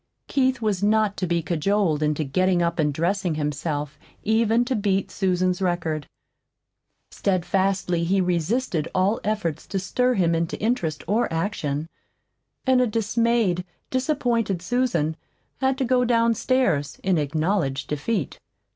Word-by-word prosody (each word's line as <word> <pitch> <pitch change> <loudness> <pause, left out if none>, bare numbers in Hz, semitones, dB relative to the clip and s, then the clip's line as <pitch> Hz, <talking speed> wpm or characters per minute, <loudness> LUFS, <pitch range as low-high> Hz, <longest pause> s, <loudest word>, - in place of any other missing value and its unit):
Keith 260 -3 +1
was 205 -4 0
not 210 0 +2
to 185 - -2
be 170 -1 0
cajoled 170 -1 +1
into 150 0 +1
getting 185 +6 +1
up 170 +1 -1
and 150 -2 +2
dressing 175 +3 0
himself 150 -1 -3 0.2
even 225 +2 +2
to 255 +1 -1
beat 200 -2 0
Susan's 185 -1 0
record. 170 -5 -1 1.0
Steadfastly 190 -1 0
he 190 +3 +2
resisted 180 - 0
all 190 +4 +2
efforts 205 -8 -2
to 195 - -3
stir 250 +7 +1
him 170 -3 +2
into 165 0 -1
interest 175 - -1
or 220 +1 +1
action; 160 -4 -2 0.8
and 260 -1 +4
a 250 - +3
dismayed, 225 -3 +1 0.3
disappointed 245 - 0
Susan 180 -8 0 0.4
had 265 0 +1
to 265 - 0
go 250 0 +3
downstairs 230 - +1
in 185 -4 +2
acknowledged 155 -1 -1
defeat. 150 - -2
190 Hz, 130 wpm, -24 LUFS, 165-230 Hz, 1.0 s, and